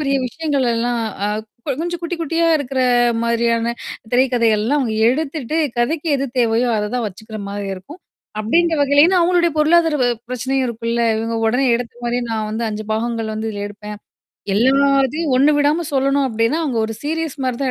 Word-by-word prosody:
பெரிய 275 Hz, -2 st, +1 dB
விஷயங்களல்லாம் 245 Hz, -5 st, -1 dB, 0.2 s
அ -, -, 0 dB, 0.4 s
கொ -, -, -1 dB
கொஞ்சம் 345 Hz, 0 st, -3 dB
குட்டி 345 Hz, +1 st, -3 dB
குட்டியா 330 Hz, +1 st, 0 dB
இருக்கிற 270 Hz, -2 st, -2 dB, 0.4 s
மாதிரியான 235 Hz, 0 st, +1 dB, 0.4 s
திரைக்கதை 245 Hz, -2 st, +3 dB
எல்லாம் 245 Hz, +8 st, +1 dB
அவங்க 230 Hz, -5 st, -1 dB
எடுத்துட்டு, 295 Hz, +1 st, -2 dB, 0.2 s
கதைக்கு 300 Hz, +7 st, 0 dB
எது 275 Hz, 0 st, -2 dB
தேவையோ 235 Hz, +1 st, +2 dB
அதைத் 210 Hz, +2 st, -2 dB
தான் 240 Hz, -3 st, -1 dB
வச்சுக்கிற 215 Hz, +3 st, -8 dB
மாரி 200 Hz, 0 st, -4 dB
இருக்கும். 285 Hz, -, -12 dB, 0.4 s
அப்படீன்ற 330 Hz, +10 st, +2 dB
வகையிலயும் 285 Hz, +3 st, +5 dB
ஏன்னா 375 Hz, -, +3 dB
அவங்களோடைய 345 Hz, -1 st, +2 dB
பொருளாதார 325 Hz, +1 st, +4 dB
வ -, -, +3 dB, 0.2 s
பிரச்சனையும் 260 Hz, +1 st, -1 dB
இருக்கும்ல்ல. 235 Hz, 0 st, -2 dB
"இவங்க 225 Hz, +1 st, -2 dB
உடனே 250 Hz, +5 st, +2 dB
எடுத்த 240 Hz, -1 st, -6 dB
மாதிரியே, 240 Hz, +1 st, -1 dB
நா 225 Hz, -, -1 dB
வந்து 225 Hz, +2 st, -2 dB
5 210 Hz, 0 st, -4 dB
பாகங்கள் 225 Hz, 0 st, -2 dB
வந்து 220 Hz, +1 st, -3 dB
இதுல 205 Hz, -1 st, -5 dB
எடுப்பேன். 210 Hz, 0 st, -9 dB, 0.6 s
எல்லாத்தையும் 275 Hz, +5 st, +2 dB
ஒண்ணு 275 Hz, +4 st, +5 dB
விடாம 295 Hz, +4 st, +2 dB
சொல்லணும்." 275 Hz, +1 st, +2 dB
அப்படீன்னா, 230 Hz, +5 st, 0 dB
அவங்க 260 Hz, -6 st, -1 dB
ஒரு 225 Hz, -, -5 dB
சீரியஸ் 320 Hz, 0 st, -3 dB
மாரி 255 Hz, -2 st, -1 dB
தான் 265 Hz, -, 0 dB
255 Hz, 170 wpm, -19 LUFS, 230-295 Hz, 0.6 s, வகையிலயும்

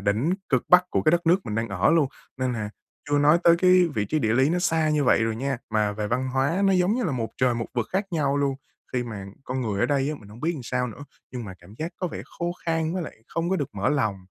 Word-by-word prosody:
đỉnh 110 Hz, -, +1 dB
cực 130 Hz, -4 st, +1 dB
bắc 180 Hz, 0 st, +7 dB
của -, -, +1 dB
cái 155 Hz, -, +4 dB
đất 175 Hz, -1 st, +1 dB
nước 175 Hz, +3 st, +5 dB
mình 105 Hz, -, -3 dB
đang 115 Hz, +1 st, -1 dB
ở 100 Hz, -1 st, +2 dB
luôn, 160 Hz, -4 st, +3 dB, 0.3 s
nên 130 Hz, -1 st, 0 dB
là 105 Hz, -3 st, -4 dB, 0.4 s
chưa 145 Hz, -, +3 dB
nói 150 Hz, +4 st, +5 dB
tới 170 Hz, 0 st, +7 dB
cái 185 Hz, 0 st, +5 dB
vị 105 Hz, -, 0 dB
trí 155 Hz, +10 st, -1 dB
địa 110 Hz, -6 st, +1 dB
lý 130 Hz, +5 st, +3 dB
nó 175 Hz, -, +1 dB
xa 160 Hz, -3 st, +1 dB
như 150 Hz, -1 st, +2 dB
vậy 115 Hz, -, +4 dB
rồi 115 Hz, -1 st, -1 dB
nha, 135 Hz, +1 st, -2 dB
mà 105 Hz, -1 st, +1 dB
về 105 Hz, 0 st, -3 dB
văn 130 Hz, +4 st, -1 dB
hóa 140 Hz, +9 st, +1 dB
nó, 195 Hz, -, +4 dB
giống 185 Hz, +2 st, +3 dB
như 250 Hz, 0 st, -1 dB
là, 160 Hz, -, 0 dB
một 115 Hz, -3 st, -2 dB
trời 125 Hz, -1 st, +2 dB
một 115 Hz, -1 st, -3 dB
vực 120 Hz, -3 st, 0 dB
khác 195 Hz, +1 st, 0 dB
nhau 145 Hz, -4 st, +1 dB
luôn, 140 Hz, -1 st, +1 dB, 0.4 s
khi 125 Hz, -1 st, 0 dB
mà 105 Hz, -5 st, -6 dB, 0.2 s
con 130 Hz, +1 st, -3 dB
người 105 Hz, -5 st, -2 dB
ở -, -, +3 dB
đây 140 Hz, -1 st, +1 dB
á, -, -, -3 dB
mình 100 Hz, -, -14 dB
hông 110 Hz, +3 st, -13 dB
biết 165 Hz, +4 st, 0 dB
làm 135 Hz, -, -7 dB
sao 125 Hz, +1 st, -1 dB
nữa, 125 Hz, +5 st, -9 dB, 0.3 s
nhưng 125 Hz, -2 st, -5 dB
mà 95 Hz, -3 st, -8 dB
cảm 95 Hz, +5 st, -15 dB
giác 160 Hz, +2 st, -4 dB
có 185 Hz, -, -2 dB
vẻ -, -, -6 dB, 0.2 s
khô 175 Hz, 0 st, -1 dB
khan 165 Hz, 0 st, 0 dB
với 185 Hz, -, -1 dB
lại -, -, -7 dB
không 165 Hz, +2 st, -2 dB
có 190 Hz, -, +2 dB
được 145 Hz, -, -2 dB
mở 100 Hz, 0 st, 0 dB
lòng. 110 Hz, -9 st, +1 dB
135 Hz, 295 wpm, -25 LUFS, 115-165 Hz, 0.4 s, bắc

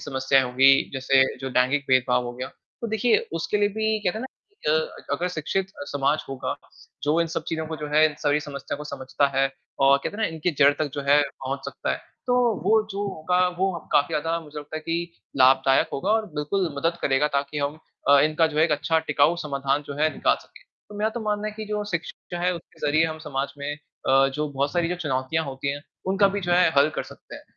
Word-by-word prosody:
समस्याएँ 130 Hz, 0 st, +3 dB
हो 125 Hz, -, -5 dB
गई, 135 Hz, +2 st, +6 dB
जैसे 135 Hz, 0 st, +3 dB, 0.2 s
जो 135 Hz, -1 st, -4 dB
दैनिक 135 Hz, +3 st, +2 dB
भेदभाव 125 Hz, -1 st, +3 dB
हो 120 Hz, -, -5 dB
गया। 130 Hz, +2 st, -6 dB, 0.3 s
तो 235 Hz, -, -3 dB
देखिए 220 Hz, +1 st, +3 dB, 0.2 s
उसके 165 Hz, +5 st, -1 dB
लिए 205 Hz, 0 st, +3 dB
भी 220 Hz, +1 st, 0 dB
कहते 200 Hz, +1 st, -1 dB
हैं -, -, -5 dB
ना 260 Hz, -, -4 dB
कि 415 Hz, -, -6 dB
अ, 485 Hz, 0 st, -2 dB
अगर 180 Hz, +1 st, -1 dB
शिक्षित 180 Hz, +3 st, -2 dB, 0.2 s
अ, -, -, -5 dB
समाज 145 Hz, +2 st, +1 dB
होगा, 135 Hz, -1 st, -3 dB, 0.5 s
जो 150 Hz, +3 st, +2 dB
इन 170 Hz, -, +2 dB
सब -, -, 0 dB
चीज़ों 160 Hz, -1 st, -2 dB
को 160 Hz, 0 st, -5 dB
जो 150 Hz, 0 st, -5 dB
है, 155 Hz, +1 st, +6 dB
इन 150 Hz, -, -9 dB
सभी 150 Hz, -1 st, +1 dB
समस्याओं 140 Hz, 0 st, -6 dB
को 150 Hz, -, -7 dB
समझता 140 Hz, -1 st, -1 dB
है 135 Hz, 0 st, +3 dB, 0.4 s
और 140 Hz, 0 st, +7 dB
कहते -, -, -3 dB
हैं 220 Hz, -, -2 dB
ना -, -, +1 dB
इनकी 160 Hz, +3 st, 0 dB
जड़ 140 Hz, +1 st, +7 dB
तक 150 Hz, -3 st, -1 dB
जो 145 Hz, -, -2 dB
है 145 Hz, +1 st, +7 dB
पहुँच 135 Hz, -1 st, -5 dB
सकता -, -, -4 dB
है, -, -, -1 dB, 0.3 s
तो 245 Hz, -, +2 dB, 0.3 s
वो 220 Hz, 0 st, +4 dB
जो 200 Hz, +1 st, -3 dB
होगा, 180 Hz, -1 st, -1 dB
वो 190 Hz, +2 st, -1 dB, 0.2 s
काफ़ी 145 Hz, +2 st, +3 dB
ज़्यादा 165 Hz, +2 st, 0 dB
मुझे 150 Hz, -1 st, -9 dB
लगता 150 Hz, +1 st, -7 dB
है -, -, -4 dB
कि 170 Hz, +2 st, -3 dB, 0.2 s
लाभदायक 135 Hz, +1 st, +5 dB
होगा 185 Hz, +9 st, -1 dB
और 220 Hz, -1 st, +1 dB
बिल्कुल 170 Hz, +5 st, 0 dB
मदद 165 Hz, +4 st, 0 dB
करेगा 135 Hz, +2 st, +2 dB
ताकि 140 Hz, +1 st, -2 dB
हम 145 Hz, +2 st, -2 dB, 0.3 s
अ, 140 Hz, 0 st, +8 dB
इनका 155 Hz, +2 st, +3 dB
जो 155 Hz, -1 st, -4 dB
है 155 Hz, -, +6 dB
एक 165 Hz, -, +1 dB
अच्छा 150 Hz, +2 st, +1 dB
टिकाऊ 145 Hz, +4 st, +3 dB
समाधान 140 Hz, 0 st, -1 dB
जो 140 Hz, -, -6 dB
है 155 Hz, 0 st, +3 dB
निकाल -, -, +2 dB
सकें। -, -, -19 dB, 0.2 s
तो 210 Hz, -, -11 dB
मेरा 215 Hz, -, +2 dB
तो 235 Hz, +1 st, -5 dB
मानना 210 Hz, -1 st, -1 dB
है -, -, -6 dB
कि 220 Hz, -, -5 dB
जो 210 Hz, 0 st, -2 dB
शिक्षित 170 Hz, -2 st, -3 dB, 0.2 s
जो 175 Hz, -, -2 dB
हैं 180 Hz, -, +3 dB
उनके 170 Hz, -2 st, -11 dB
ज़रिए 155 Hz, +2 st, +3 dB
हम 160 Hz, -1 st, -3 dB
समाज 135 Hz, -1 st, -2 dB
में 140 Hz, +1 st, -3 dB, 0.4 s
अ, 135 Hz, +1 st, +5 dB
जो 150 Hz, 0 st, -1 dB
बहुत 140 Hz, 0 st, -1 dB
सारी 170 Hz, -1 st, +1 dB
जो 180 Hz, -, -1 dB
चुनौतियाँ 130 Hz, +4 st, 0 dB
होती 135 Hz, 0 st, -4 dB
हैं, 145 Hz, -, -6 dB, 0.3 s
उनका 195 Hz, +1 st, +4 dB
भी 200 Hz, -, -1 dB
जो 175 Hz, -1 st, -1 dB
है 175 Hz, -1 st, +5 dB
हल 140 Hz, +2 st, +6 dB
कर -, -, -2 dB
सकते -, -, -14 dB
हैं -, -, -13 dB
150 Hz, 240 wpm, -25 LUFS, 140-180 Hz, 0.5 s, अ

